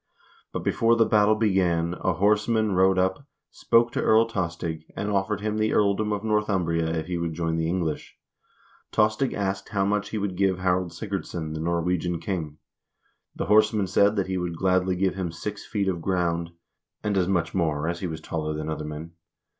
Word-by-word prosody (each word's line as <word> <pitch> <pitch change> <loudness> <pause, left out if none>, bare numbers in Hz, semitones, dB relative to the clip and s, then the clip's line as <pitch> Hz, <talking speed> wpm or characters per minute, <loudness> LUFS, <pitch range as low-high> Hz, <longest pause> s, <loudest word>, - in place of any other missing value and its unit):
But - - -4
before 115 0 +3
the 115 -1 +4
battle 105 0 +4
began, 90 -6 +1
a 95 - +1
horseman 105 +4 +2
rode 95 0 +3
up, 95 +9 0 0.2
spoke 115 0 +2
to - - -1
Earl 110 +1 +5
Tostig, 85 -6 -3
and 105 +1 -2
offered 100 +1 0
him 110 0 -1
the 110 0 +1
earldom 105 +1 +2
of 105 0 -2
Northumbria 95 -7 +1
if 80 -1 -2
he 90 0 -3
would 85 -1 -3
join 80 -1 -1
the 80 0 0
English. 85 -4 -3 0.7
Tostig 110 +5 +2
asked 95 -1 -2
how 100 -2 0
much 105 +1 0
he 110 - -3
would 100 -3 -2
give 95 -1 +2
Harald 90 -1 0
Sigurdsson, 90 -6 -4
the 80 - -4
Norwegian 85 +1 0
king. 80 -4 -4 0.8
The - - -3
horseman 105 0 +4
said 100 +3 +3
that 100 -3 0
he 95 -1 -2
would 85 -2 -3
gladly 95 0 +2
give 95 +1 +1
him 90 -3 -3
six 100 +5 -6
feet 100 -3 -1
of 90 -3 -1
ground, 85 -2 0 0.5
and 105 -1 0
as 90 -2 +2
much 85 -4 0
more 80 -4 0
as 85 0 -2
he 90 - -3
was 80 -1 -6
taller 75 -1 -3
than 75 +1 -4
other 75 -1 -4
men 75 +2 -7
95 Hz, 190 wpm, -25 LUFS, 85-105 Hz, 0.8 s, Earl